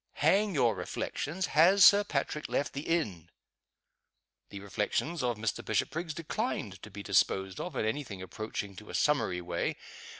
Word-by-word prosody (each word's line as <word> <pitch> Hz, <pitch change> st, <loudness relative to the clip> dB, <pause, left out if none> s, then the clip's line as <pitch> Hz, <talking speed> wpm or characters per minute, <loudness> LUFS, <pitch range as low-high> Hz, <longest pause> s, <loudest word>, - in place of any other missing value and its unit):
"Hang 195 Hz, +5 st, +2 dB
your 120 Hz, -5 st, +3 dB
reflections! 180 Hz, +6 st, -3 dB
Has 185 Hz, +5 st, +7 dB
Sir 205 Hz, 0 st, +8 dB
Patrick 150 Hz, -3 st, -2 dB
left 145 Hz, -, -1 dB
the 140 Hz, +2 st, -5 dB
inn?" 110 Hz, -, -1 dB, 1.2 s
The 100 Hz, -, -8 dB
reflections 105 Hz, -, -2 dB
of 120 Hz, -3 st, 0 dB
Mr. 105 Hz, 0 st, -2 dB
Bishopriggs 155 Hz, +9 st, -1 dB
declined 160 Hz, -, -3 dB
to 110 Hz, -, -10 dB
be 100 Hz, 0 st, -8 dB
disposed 95 Hz, -1 st, +1 dB
of -, -, -5 dB
in -, -, 0 dB
any 130 Hz, +7 st, -1 dB
thing 100 Hz, -7 st, -8 dB
approaching 100 Hz, +1 st, -5 dB
to 105 Hz, -, -11 dB
a -, -, -5 dB
summary 140 Hz, -12 st, +1 dB
way. 85 Hz, 0 st, -2 dB
125 Hz, 160 wpm, -30 LUFS, 100-165 Hz, 1.2 s, Sir